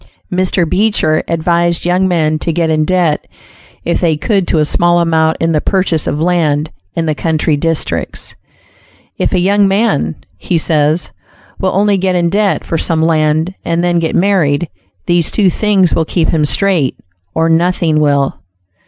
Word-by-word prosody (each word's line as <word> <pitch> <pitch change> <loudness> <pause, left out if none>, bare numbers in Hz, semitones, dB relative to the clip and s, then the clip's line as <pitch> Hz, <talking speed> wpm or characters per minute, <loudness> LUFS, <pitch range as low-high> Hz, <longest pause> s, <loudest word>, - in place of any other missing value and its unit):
Mr. 180 -1 +1
Beecher 185 -4 +1
advised 170 +1 0
young 180 +2 +2
men 155 -3 0
to 165 - -2
get 165 0 0
in 155 -1 +1
debt 175 -3 0 0.6
if 170 - 0
they 165 -4 +1
could 195 +1 0
to - - +1
a 155 - +2
small 175 +3 +2
amount 160 -1 +1
in 165 0 0
the 155 -2 +1
purchase 185 -5 0
of 145 - -2
land, 160 -3 0 0.2
in 165 - -1
the 155 - 0
country 155 0 0
districts. 165 +2 -3 0.9
"If - - 0
a - - +1
young 200 +2 +3
man," 195 - 0 0.2
he 170 - -1
says, 155 +1 0 0.5
"will 185 -1 -1
only 200 0 +2
get 185 -1 0
in 170 -1 +1
debt 205 0 0
for 165 - -2
some 160 -1 0
land 160 +2 +1
and 170 +1 -1
then 175 -1 +1
get 165 -1 -2
married, 175 -5 +1 0.4
these 175 -2 +2
two 195 -4 +2
things 195 -4 +1
will 165 - +1
keep 165 0 -1
him 155 -2 +1
straight, 170 -4 +1 0.4
or 165 0 +2
nothing 165 -1 +1
will." 140 -2 +1
170 Hz, 170 wpm, -13 LUFS, 155-185 Hz, 0.9 s, young